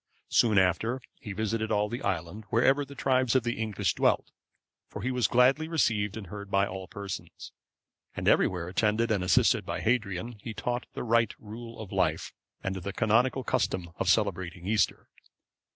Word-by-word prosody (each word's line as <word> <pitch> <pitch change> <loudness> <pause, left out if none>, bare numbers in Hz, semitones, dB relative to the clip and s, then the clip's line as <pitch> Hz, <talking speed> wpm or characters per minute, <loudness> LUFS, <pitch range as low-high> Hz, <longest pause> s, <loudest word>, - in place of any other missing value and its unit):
Soon 110 -4 +4
after, 95 +7 +2 0.2
he 105 - -7
visited 110 +2 -2
all 105 0 +2
the 120 +3 -5
island, 95 +2 -3
wherever 135 +5 +3
the 140 0 -11
tribes 130 -2 +2
of 130 - +4
the 120 -2 -2
English 105 -5 0
dwelt, - - +1 0.6
for - - -8
he 130 - 0
was 125 -2 +2
gladly 130 +6 +4
received 110 - +1
and 110 - -6
heard 100 +2 -8
by 100 0 +3
all 95 -1 -6
persons; 100 0 -7 0.6
and - - -3
everywhere 90 -2 +3
attended 110 +5 +1
and 100 -4 +1
assisted 90 - +3
by - - -4
Hadrian, 110 -1 -1
he 110 0 -6
taught 120 +3 -3
the - - -4
right 115 0 +2
rule 115 +2 -9
of 110 -4 -8
life, 85 -4 0 0.3
and 95 0 -2
the 95 +2 -5
canonical 120 +5 +2
custom 90 -6 -1
of - - 0
celebrating 90 -4 0
Easter. 105 +2 +1
110 Hz, 170 wpm, -28 LUFS, 95-120 Hz, 0.6 s, Soon